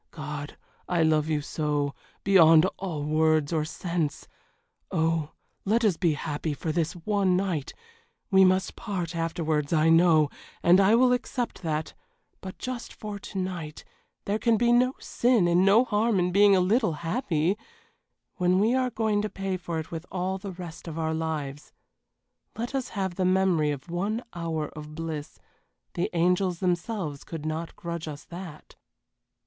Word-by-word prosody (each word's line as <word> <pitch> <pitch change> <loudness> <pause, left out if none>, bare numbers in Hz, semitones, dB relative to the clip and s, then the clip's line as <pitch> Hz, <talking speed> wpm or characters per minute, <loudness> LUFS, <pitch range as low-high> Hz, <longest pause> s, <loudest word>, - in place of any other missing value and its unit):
God! 150 -2 -7 0.3
I 175 -2 +2
love 155 -1 +2
you 150 -2 +1
so 145 -1 -1 0.3
beyond 165 -4 +7
all 170 -6 -3
words 155 0 +2
or 155 -2 +1
sense 160 -2 -3 0.6
Oh, 160 -3 0 0.3
let 225 +3 +2
us 200 -5 +3
be 170 -2 +1
happy 150 0 -3
for 160 - -3
this 160 0 0
one 185 +1 +1
night 180 -7 -2 0.6
we 190 0 +7
must 185 0 +2
part 180 -7 -4
afterwards 160 -3 -1
I 160 -1 +4
know, 165 -3 +5 0.3
and 175 +2 +6
I 200 +3 +5
will 250 +1 +5
accept 245 -1 -3
that 160 -2 -2 0.5
but 190 -1 -8
just 255 -2 -5
for 210 -1 -7
to 200 - -8
night 175 -5 -4 0.4
there 205 +2 0
can 230 -1 +3
be 240 +2 +3
no 250 +2 +3
sin 235 -7 +2
and 175 +2 +4
no 200 +5 +6
harm 220 -1 +1
in 180 0 +1
being 200 +1 +6
a - - +4
little 215 +1 +2
happy 170 - 0 0.8
when 180 0 +3
we 215 +5 +3
are 255 -1 +1
going 220 -3 0
to 210 - -2
pay 195 -1 -3
for 175 -2 -4
it 160 0 -5
with 165 +1 -6
all 190 +1 -2
the 195 0 -6
rest 175 -2 -9
of 165 -1 -6
our 160 -1 -1
lives. 150 -3 -4 0.8
Let 235 +4 -4
us 265 -2 -2
have 190 -2 -1
the 190 - +1
memory 185 -5 +3
of 145 +1 -4
one 205 +7 -1
hour 165 -3 -3
of 150 0 -10
bliss 160 -2 -5 0.6
the 175 - -1
angels 180 +1 +2
themselves 175 -4 -2
could 160 -2 -7
not 160 +1 -4
grudge 170 -1 -5
us 145 -2 -7
that." 170 -3 -10
175 Hz, 165 wpm, -27 LUFS, 155-195 Hz, 0.8 s, beyond